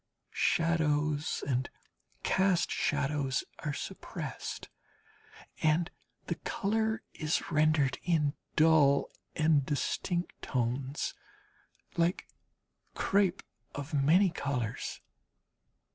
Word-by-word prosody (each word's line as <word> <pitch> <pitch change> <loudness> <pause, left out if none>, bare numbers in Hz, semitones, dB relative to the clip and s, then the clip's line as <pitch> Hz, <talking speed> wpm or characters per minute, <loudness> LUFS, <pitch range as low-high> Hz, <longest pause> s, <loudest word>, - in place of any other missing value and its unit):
Shadows 155 -3 +1
and 130 -1 0 0.5
cast 190 -2 +2
shadows 140 -3 0 0.2
are 150 - -2
suppressed, - - -6 0.9
and 160 +3 +2 0.3
the - - -2
colour 220 +2 -1
is 155 +2 -1
rendered 150 -3 +3
in 155 -5 +1 0.2
dull 155 -3 +5 0.2
and 155 -3 +4
distinct 175 +5 -2
tones 130 +2 -1 0.8
like 170 +2 +1 0.7
crape 195 -2 +2 0.3
of 145 +2 -6
many 165 +7 +4
colours. 125 -8 -3
155 Hz, 80 wpm, -31 LUFS, 140-170 Hz, 0.9 s, dull